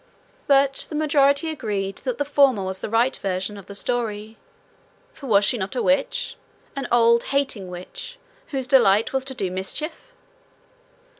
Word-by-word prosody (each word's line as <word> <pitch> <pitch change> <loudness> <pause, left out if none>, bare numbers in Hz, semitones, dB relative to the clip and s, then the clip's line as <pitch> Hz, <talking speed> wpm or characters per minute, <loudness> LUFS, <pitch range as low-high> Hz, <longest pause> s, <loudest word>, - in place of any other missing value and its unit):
But 275 -1 +3
the 310 - -6
majority 290 0 +2
agreed 200 -9 -3
that 250 -2 -2
the 285 - -1
former 275 -7 +3
was 190 0 -4
the - - -5
right 230 +4 +2
version 190 +1 -3
of 200 -2 -11
the 200 - -8
story 220 -2 -2 0.8
for 275 - -10
was 205 -3 +4
she 245 - +1
not 190 +3 -4
a 245 - 0
witch, 395 - 0 0.4
an 275 -2 -3
old 235 0 +4
hating 265 -9 -1
witch, 180 - -9 0.3
whose 270 -4 -3
delight 225 -5 +4
was 265 -1 0
to 265 -1 -6
do 190 -6 -2
mischief? 305 - -5
245 Hz, 160 wpm, -23 LUFS, 200-280 Hz, 0.8 s, was